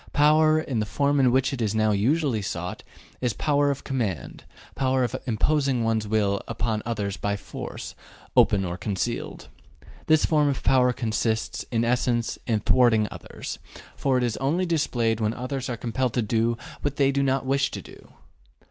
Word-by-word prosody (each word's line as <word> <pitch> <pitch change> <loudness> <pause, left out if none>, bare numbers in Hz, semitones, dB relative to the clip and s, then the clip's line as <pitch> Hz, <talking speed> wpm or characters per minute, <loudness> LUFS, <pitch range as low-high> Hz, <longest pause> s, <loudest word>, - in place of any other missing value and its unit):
Power, 155 +1 +5
in 135 -7 -2
the 105 - -1
form 140 +5 +1
in 130 -2 +4
which 135 +2 +2
it 130 - -4
is 110 -1 0
now 110 0 +3
usually 120 +3 +1
sought, 90 -2 -4 0.4
is 125 -3 0
power 145 -1 +1
of 140 -1 -3
command, 115 - -3 0.3
power 130 -1 +1
of 120 - -2
imposing 135 +1 +1
one's 110 -1 0
will 100 -2 +1
upon 110 -2 -2
others 100 -4 -2
by 100 0 -1
force, - - -7 0.4
open 95 -2 +4
or 85 0 -4
concealed. 95 -1 -3 0.6
This 155 -1 +4
form 150 -2 +3
of 135 - -3
power 125 -1 +4
consists, 115 -2 -2
in 115 -1 +1
essence, 120 -1 0
in 110 -3 +1
thwarting 115 -3 +4
others, - - -7 0.4
for 135 -2 +1
it 125 - +1
is 120 -3 -1
only 155 +8 0
displayed 120 -9 0
when 110 +1 0
others 130 +1 -4
are 120 - -3
compelled 120 +1 -1
to 120 - +1
do 115 +1 +1 0.2
what 145 -1 -2
they 140 -1 +3
do 140 0 0
not 135 -1 +1
wish 135 +1 +1
to - - -7
do. - - -15
125 Hz, 175 wpm, -25 LUFS, 110-135 Hz, 0.6 s, Power